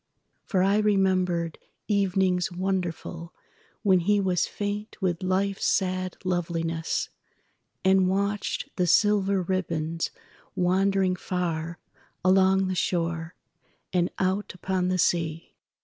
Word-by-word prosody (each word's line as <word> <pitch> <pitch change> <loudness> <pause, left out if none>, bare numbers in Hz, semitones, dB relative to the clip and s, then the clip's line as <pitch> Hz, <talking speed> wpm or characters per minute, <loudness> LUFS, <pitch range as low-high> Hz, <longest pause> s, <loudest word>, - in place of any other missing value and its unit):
For 185 -2 +2
I 200 +2 +3
remembered 185 -5 +1 0.3
evenings 190 -3 +2
wonderfulWhen 180 +1 -2
he 205 +4 +3
was 185 -3 +1
faint 205 +1 -4
with 180 -4 -1
Life's 190 +1 0
sad 185 -1 0
loveliness, 165 -2 -1 0.8
And 190 -1 +5
watched 200 +2 -1
the 180 -1 +2
silver 200 0 +3
ribbons 165 -3 -2 0.5
wandering 190 +1 +2
farAlong 185 +2 0
the 185 - -1
shore, 170 -2 -1 0.6
and 175 -1 +2
out 190 +1 -1
upon 185 0 -1
the 185 0 +1
sea. 165 -2 0
185 Hz, 100 wpm, -26 LUFS, 175-195 Hz, 0.8 s, And